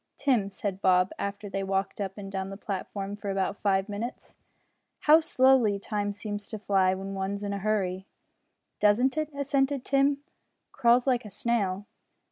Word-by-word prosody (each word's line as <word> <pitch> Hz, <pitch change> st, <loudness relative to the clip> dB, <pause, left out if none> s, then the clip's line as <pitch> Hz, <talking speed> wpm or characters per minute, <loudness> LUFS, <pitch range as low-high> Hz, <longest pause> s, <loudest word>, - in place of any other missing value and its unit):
"Tim," 240 Hz, -8 st, +2 dB
said 195 Hz, -1 st, -4 dB
Bob 185 Hz, -1 st, +4 dB
after 205 Hz, +1 st, -4 dB
they 195 Hz, 0 st, -3 dB
had 195 Hz, -, -3 dB
walked 195 Hz, +1 st, -1 dB
up 195 Hz, 0 st, -4 dB
and 195 Hz, -1 st, -7 dB
down 190 Hz, 0 st, -3 dB
the 195 Hz, -, -7 dB
platform 200 Hz, -1 st, -4 dB
for 205 Hz, -1 st, -6 dB
about 195 Hz, 0 st, 0 dB
five 195 Hz, -1 st, +2 dB
minutes, 215 Hz, +4 st, -6 dB, 0.7 s
"how 305 Hz, +2 st, +7 dB
slowly 260 Hz, -8 st, +4 dB
time 205 Hz, 0 st, -2 dB
seems 205 Hz, 0 st, -5 dB
to 220 Hz, -, -5 dB
fly 190 Hz, -2 st, +2 dB
when 195 Hz, +1 st, -6 dB
one's 195 Hz, +1 st, -3 dB
in 200 Hz, 0 st, -2 dB
a 200 Hz, -, -3 dB
hurry!" 190 Hz, -2 st, -1 dB, 0.7 s
"Doesn't 235 Hz, +6 st, +3 dB
it?" 310 Hz, -1 st, -1 dB
assented 275 Hz, -1 st, 0 dB
Tim, 275 Hz, +1 st, +2 dB, 0.5 s
"crawls 240 Hz, 0 st, +3 dB
like 250 Hz, -3 st, +2 dB
a 210 Hz, -, -9 dB
snail." 205 Hz, -2 st, -1 dB
205 Hz, 170 wpm, -28 LUFS, 195-240 Hz, 0.7 s, how